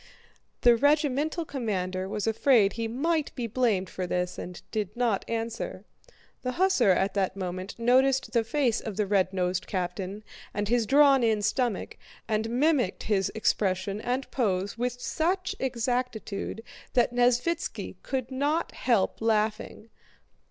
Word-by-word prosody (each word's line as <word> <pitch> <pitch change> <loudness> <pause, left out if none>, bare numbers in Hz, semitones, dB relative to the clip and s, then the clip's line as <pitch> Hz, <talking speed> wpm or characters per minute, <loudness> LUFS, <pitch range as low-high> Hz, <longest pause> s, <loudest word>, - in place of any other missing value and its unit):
The 240 -1 +6
regimental 295 +4 +1
commander 190 -9 -3
was 210 0 -2
afraid 225 -2 +4
he 230 -1 -2
might 300 +6 0
be 245 - -3
blamed 225 -5 +1
for 180 +1 -4
this 180 0 -2
and 180 0 -7
did 210 -2 -3
not 235 -5 +1
answer. 230 -3 -4 0.6
The 255 0 -2
hussar 365 - +3
at 190 +1 +2
that 195 -2 0
moment 185 0 -5
noticed 260 +3 +3
the 230 -2 +3
face 245 0 0
of 215 -4 -6
the 210 - +1
red 190 -2 +2
nosed 180 -1 -1
captain 185 +2 -3 0.3
and 205 0 -1
his 235 0 +1
drawn 280 0 +6
in 220 -3 +2
stomach, 230 -1 -1 0.3
and 220 0 0
mimicked 255 - +1
his 195 -3 +1
expression 195 -1 0
and 255 +3 -2
pose 200 -5 0
with 245 +1 -2
such 370 +8 -1
exactitude 235 -4 -2 0.3
that 245 -1 +3
Nesvítski 245 +7 0
could 260 -1 -3
not 290 +5 0
help 230 -6 0
laughing. 220 0 -1
230 Hz, 140 wpm, -27 LUFS, 200-260 Hz, 0.6 s, The